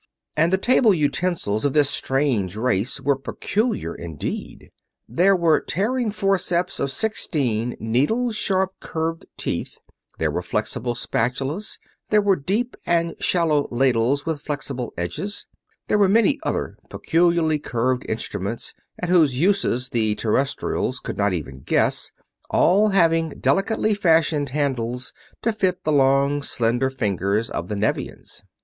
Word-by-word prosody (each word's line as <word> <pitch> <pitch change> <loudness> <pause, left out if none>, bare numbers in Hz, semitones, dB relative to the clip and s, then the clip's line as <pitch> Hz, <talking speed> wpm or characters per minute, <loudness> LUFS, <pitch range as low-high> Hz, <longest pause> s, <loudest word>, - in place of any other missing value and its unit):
And 165 +3 +3
the 190 - +4
table 225 0 +4
utensils 150 - 0
of 140 -2 +1
this 150 -2 +4
strange 130 -11 0
race 115 +1 0
were 140 +1 +2
peculiar 205 - -2
indeed. 80 -4 -6 0.4
There 180 - +3
were 170 -3 +3
tearing 230 +6 -1
forceps 195 -4 0
of 140 - -1
sixteen 130 - -1
needle 145 - +1
sharp 190 -3 0
curved 165 +1 -4
teeth; - - -3 0.4
there - - 0
were - - -2
flexible 120 0 -2
spatulas; 135 - -2 0.3
there 210 - +4
were 200 -2 +3
deep 205 - -2
and 170 -1 +1
shallow 160 -5 +2
ladles 125 +2 +1
with 160 -3 -2
flexible 135 -5 -4
edges; 150 - -4 0.4
there 210 - +2
were 200 -2 +5
many 230 +7 +3
other - - -3
peculiarly 165 -2 +2
curved 125 -1 -1
instruments 110 0 -4 0.2
at 180 - -4
whose 155 -8 +4
uses 170 -9 +1
the 110 -3 0
Terrestrials 130 +2 -1
could - - -6
not 100 0 +2
even 75 -7 -5
guess; - - 0 0.4
all 200 +5 +4
having 165 -5 +2
delicately 195 +9 +1
fashioned 160 -7 +2
handles 125 -3 -2 0.3
to 230 - +1
fit 185 -4 0
the 155 - 0
long 140 +1 +3
slender 120 0 0
fingers 105 -3 -1
of 85 - -3
the 105 - -3
Nevians. 105 +2 -3
145 Hz, 135 wpm, -23 LUFS, 120-185 Hz, 0.4 s, were